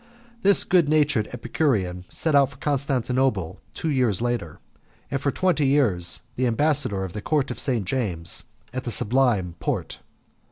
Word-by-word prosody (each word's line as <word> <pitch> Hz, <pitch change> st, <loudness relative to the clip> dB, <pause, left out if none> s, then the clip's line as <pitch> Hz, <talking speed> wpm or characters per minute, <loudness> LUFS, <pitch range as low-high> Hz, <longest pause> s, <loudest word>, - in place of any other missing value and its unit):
This 200 Hz, -1 st, +5 dB
good 175 Hz, -5 st, +3 dB
natured 150 Hz, -8 st, +2 dB
Epicurean 95 Hz, -, -1 dB
set 160 Hz, -, -1 dB
out 140 Hz, -2 st, +5 dB
for 140 Hz, -, -16 dB
Constantinople 130 Hz, -, 0 dB, 0.2 s
two 160 Hz, -, -2 dB
years 125 Hz, -8 st, +2 dB
later, 120 Hz, -10 st, -2 dB, 0.5 s
and 135 Hz, -, 0 dB
was -, -, -16 dB
for 140 Hz, -, +1 dB
twenty 160 Hz, -1 st, +1 dB
years 105 Hz, -12 st, +1 dB
the 130 Hz, 0 st, +1 dB
ambassador 125 Hz, -5 st, +2 dB
of 95 Hz, -2 st, -6 dB
the 105 Hz, -, -5 dB
Court 145 Hz, +3 st, 0 dB
of -, -, -5 dB
St. 120 Hz, -7 st, 0 dB
James 90 Hz, -7 st, -3 dB, 0.3 s
at 130 Hz, 0 st, -3 dB
the -, -, -4 dB
Sublime 110 Hz, -6 st, +1 dB
Porte. -, -, -3 dB
130 Hz, 160 wpm, -24 LUFS, 100-145 Hz, 0.5 s, This